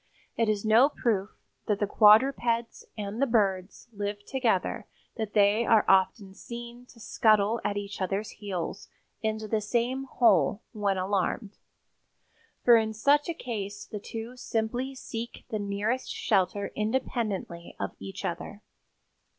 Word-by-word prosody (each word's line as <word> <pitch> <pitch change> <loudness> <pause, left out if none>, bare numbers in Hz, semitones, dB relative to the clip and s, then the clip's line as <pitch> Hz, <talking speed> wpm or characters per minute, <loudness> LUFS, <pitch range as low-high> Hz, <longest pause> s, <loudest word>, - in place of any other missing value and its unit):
It 230 -2 +1
is 210 0 0
no 230 +6 +6
proof 215 -8 -1 0.4
that 210 - +1
the 205 - +2
quadrupeds 230 +3 +3
and 210 +3 -4
the 275 - +3
birds 195 -3 0
live 205 0 -4
together 235 -9 0 0.3
that 220 -2 -4
they 205 +2 +4
are 225 -2 +4
often 190 +1 +2
seen 240 +3 -9
to 235 - -18
scuttle 215 0 +2
at 205 - -1
each 200 -1 -5
other's 195 +3 -2
heels 190 -5 -5 0.3
into 220 -1 -2
the 215 0 0
same 245 +5 -1
hole 210 - +3
when 205 -4 0
alarmed, 195 +2 -2 1.1
for 240 -1 +8
in 220 -1 -1
such 290 +8 +3
a 335 - -2
case 205 - -5
the 210 - -7
two 225 +4 -7
simply 245 +3 -2
seek 235 -2 -7
the 215 - -1
nearest 205 +5 -2
shelter 195 +2 0
independently 215 -6 -2
of 100 - -2
each 95 0 -7
other." - - -5
215 Hz, 140 wpm, -28 LUFS, 200-235 Hz, 1.1 s, for